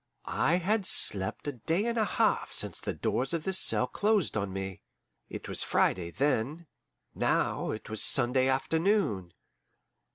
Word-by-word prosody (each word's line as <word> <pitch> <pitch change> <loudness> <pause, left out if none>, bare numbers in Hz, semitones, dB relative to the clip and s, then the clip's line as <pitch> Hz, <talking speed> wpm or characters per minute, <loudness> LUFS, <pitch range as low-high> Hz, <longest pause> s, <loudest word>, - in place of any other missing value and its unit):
I 165 - +1
had 190 +3 0
slept 95 +7 +2
a 145 - -2
day 160 - -2
and 235 0 -1
a 225 - +2
half 180 - 0
since - - -2
the - - -5
doors 135 +6 -1
of 165 - -4
this 190 +1 +4
cell - - +4
closed 210 - 0
on 100 -2 -2
me. 95 -1 -6 0.5
It - - -8
was - - -2
Friday 85 -2 0
then; 140 - -1 0.5
now - - 0
it 110 - -6
was 110 0 -2
Sunday 130 0 +3
afternoon. 135 - 0
140 Hz, 155 wpm, -29 LUFS, -, 0.5 s, this